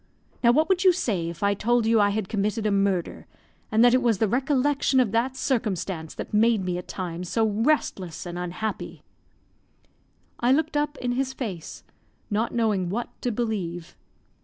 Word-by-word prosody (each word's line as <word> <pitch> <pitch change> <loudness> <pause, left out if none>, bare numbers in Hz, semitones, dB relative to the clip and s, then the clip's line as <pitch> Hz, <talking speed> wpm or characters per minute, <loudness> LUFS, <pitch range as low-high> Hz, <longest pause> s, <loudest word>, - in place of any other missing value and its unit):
Now 235 - +7
what 310 +6 +3
would 375 -1 +2
you 375 - +7
say 195 - -1
if 170 +3 -7
I 200 0 +3
told 235 +3 +1
you 225 0 +4
I 205 - +4
had 205 -1 -2
committed 210 +2 -1
a 210 - +2
murder, 195 -3 0 0.4
and 220 +2 +5
that 245 - +6
it 255 - +4
was 235 -4 +2
the 220 - +2
recollection 270 +3 +1
of 240 -6 +2
that 245 +4 0
circumstance 190 - -2
that - - -7
made 215 -2 +3
me 180 -1 -1
at 180 - -10
times 175 -1 -5
so 225 -1 +2
restless 205 - 0
and 175 0 -6
unhappy?" 180 +5 -5 1.4
I 245 +2 +3
looked 315 +1 0
up 295 0 0
in 245 -1 -2
his 265 +1 -1
face, 195 - -6 0.5
not 220 +3 0
knowing 210 -6 0
what 235 +6 -3
to 245 - -1
believe. 195 -7 -3
220 Hz, 180 wpm, -25 LUFS, 190-245 Hz, 1.4 s, Now